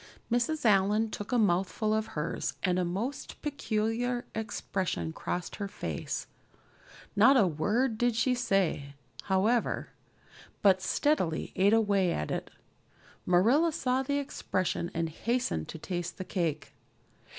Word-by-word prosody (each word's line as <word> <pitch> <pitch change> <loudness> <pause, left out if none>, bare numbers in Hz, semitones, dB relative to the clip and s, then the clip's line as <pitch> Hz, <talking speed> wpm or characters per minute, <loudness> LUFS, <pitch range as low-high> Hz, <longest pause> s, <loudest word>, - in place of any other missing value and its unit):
Mrs. 245 +5 0
Allan 210 +1 +3
took 205 - -6
a 250 - +3
mouthful 205 +1 +1
of 220 0 0
hers 150 +2 -2
and 180 -1 +2
a - - +2
most 200 +11 -4
peculiar 245 -3 -1
expression 195 -6 -3
crossed 175 +2 -4
her 200 - -3
face; - - -4 0.9
not 245 +7 +7
a 215 - +5
word 215 - 0
did 240 -1 +2
she 250 +3 +2
say, 190 - 0 0.3
however, 210 +5 +1 0.7
but 190 -2 +5
steadily 185 - 0
ate 195 +2 +4
away 200 -5 +3
at 75 - -2
it. - - -3 0.8
Marilla 235 - +4
saw 260 -3 0
the 280 +2 -1
expression 185 -10 -2
and 165 0 0
hastened 165 - -1
to - - -7
taste 175 +1 -4
the 185 - -5
cake. 160 -7 -2
205 Hz, 130 wpm, -30 LUFS, 180-245 Hz, 0.9 s, not